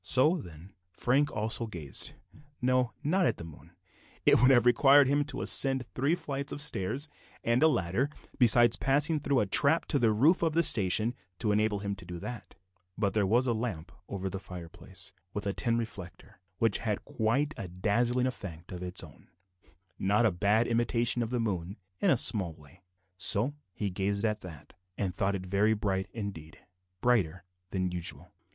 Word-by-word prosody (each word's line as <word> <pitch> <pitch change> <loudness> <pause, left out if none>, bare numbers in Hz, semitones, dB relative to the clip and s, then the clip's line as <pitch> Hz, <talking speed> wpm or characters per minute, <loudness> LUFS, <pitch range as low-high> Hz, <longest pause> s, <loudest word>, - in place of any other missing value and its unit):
So, 130 - +3
then, 90 - -11 0.2
Frank 135 +10 +1
also 110 +2 -1
gazed 80 - -2 0.5
no, 125 0 +1
not 180 +4 +2
at - - -1
the - - -8
moon; 80 -3 -13 0.5
it - - +5
would 125 - +6
have 125 -3 +5
required 135 +3 +6
him 145 +2 +2
to 145 - -5
ascend 135 -2 +2
three 140 +6 +1
flights 140 -5 -5
of - - -5
stairs, 140 -1 0 0.4
and 120 +2 +2
a 160 - +7
ladder, 120 - 0 0.3
besides 120 -1 +6
passing 150 +3 +1
through 140 -3 +1
a - - +1
trap 140 +11 +3
to 145 - +2
the 115 -3 +3
roof 145 - +3
of 165 -2 +1
the 170 +1 +3
station, 110 - +4 0.2
to 110 -3 0
enable 105 -1 +1
him 100 0 -2
to - - -8
do 90 - -7
that; 120 +7 -8 0.4
but 100 -3 0
there 105 -3 +1
was 120 +6 +3
a 120 - +1
lamp 110 -8 -4 0.2
over 95 -1 -4
the 95 0 -4
fireplace, 90 -3 -6 0.2
with 105 - -3
a 100 - -1
tin 115 +2 0
reflector, 100 -6 -7 0.2
which 115 -3 +1
had 105 -3 -3
quite 130 +7 0
a 95 - -6
dazzling 115 +8 +1
effect 95 -10 -6
of 90 -1 -7
its 90 0 -4
own - - -15 0.7
not 105 +5 +2
a 110 - +4
bad 105 +6 +2
imitation 120 0 +1
of 115 - -2
the 125 0 -1
moon 95 -4 -3 0.2
in - - +2
a 135 - +4
small 95 -7 +1
way 80 +4 -19 0.4
so 105 +7 +2 0.2
he 100 +1 -3
gazed 100 +3 -1
at 105 -1 0
that, 85 -7 -11 0.2
and 95 -3 -2
thought 100 +1 0
it 95 -1 -5
very 100 +4 +2
bright 95 -2 -1
indeed; 95 -8 -7 0.4
brighter 95 -8 +1 0.3
than 95 -2 -2
usual. 90 -1 -3
110 Hz, 185 wpm, -30 LUFS, 95-125 Hz, 0.7 s, a